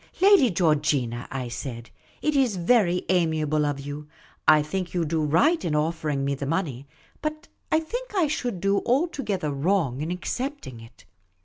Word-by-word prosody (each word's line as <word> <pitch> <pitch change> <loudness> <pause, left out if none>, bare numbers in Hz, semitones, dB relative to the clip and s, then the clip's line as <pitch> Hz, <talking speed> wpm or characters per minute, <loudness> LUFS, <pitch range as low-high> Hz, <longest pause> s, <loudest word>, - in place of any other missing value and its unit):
" - - -24
Lady 385 - +6
Georgina," 150 - +1
I 130 -2 -4
said, 120 -1 -7 0.2
" - - -31
it 305 -1 +1
is 260 -7 +2
very 180 -1 +2
amiable 155 -4 +1
of 145 -1 -2
you. 145 +2 -7 0.4
I 155 -1 +6
think 180 +4 -4
you 170 -2 +1
do 160 +1 0
right 280 - +3
in 160 -4 -1
offering 150 -2 -1
me 140 - 0
the 140 0 -4
money; 145 -5 -2 0.3
but 305 0 -4 0.2
I 315 - +3
think 485 +7 -6
I 365 -4 +3
should 245 - -2
do 195 0 +2
altogether 245 - -1
wrong 145 -2 0
in 155 - -3
accepting 180 - -4
it. 115 +1 -16
165 Hz, 175 wpm, -25 LUFS, 145-245 Hz, 0.4 s, Lady